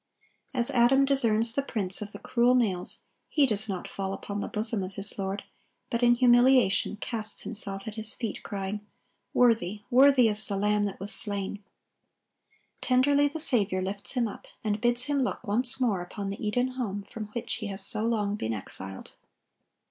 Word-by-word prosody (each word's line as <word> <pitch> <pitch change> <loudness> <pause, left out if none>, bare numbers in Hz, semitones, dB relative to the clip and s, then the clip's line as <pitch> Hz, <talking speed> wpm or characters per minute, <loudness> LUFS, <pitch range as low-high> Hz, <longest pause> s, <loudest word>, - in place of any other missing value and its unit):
As 245 -3 -2
Adam 260 +3 +4
discerns 230 -4 +5
the 280 - 0
prints 200 -8 -4
of 205 -1 -7
the - - -9
cruel 245 +1 +1
nails, 195 -8 +3 0.3
he 295 -3 +3
does 215 -3 0
not 185 -2 -5
fall 195 -1 -5
upon 200 +1 -6
the - - -4
bosom 215 0 +2
of 185 +1 -7
his 195 +1 +5
Lord, 195 +1 -4 0.5
but 235 - -1
in 240 0 +4
humiliation 245 -4 +3
casts 220 -1 -4
himself 195 -3 0
at 220 - -5
His 220 0 0
feet, 230 -3 -5
crying, 200 +1 -5 0.5
"Worthy, 215 -4 +1
worthy 260 -1 +5
is 215 0 -2
the 200 - -3
Lamb 210 +1 +1
that 200 - -6
was 200 +2 -4
slain!" 200 -1 -3 1.2
Tenderly 280 +3 +2
the 305 +3 -6
Saviour 200 - +3
lifts 200 +1 -4
him 245 -3 0
up, 205 - -11 0.2
and 210 -1 -2
bids 240 0 +3
him 285 +1 -1
look 250 - -3
once 245 +6 0
more 220 -8 0
upon 195 +3 -6
the 200 - -8
Eden 245 +4 0
home 220 -6 -5
from 215 +2 -8
which 235 - -4
he 215 - -6
has 195 -1 0
so 215 - +3
long 210 -3 -1
been 115 - -3
exiled. 95 -1 -8
215 Hz, 180 wpm, -27 LUFS, 200-245 Hz, 1.2 s, discerns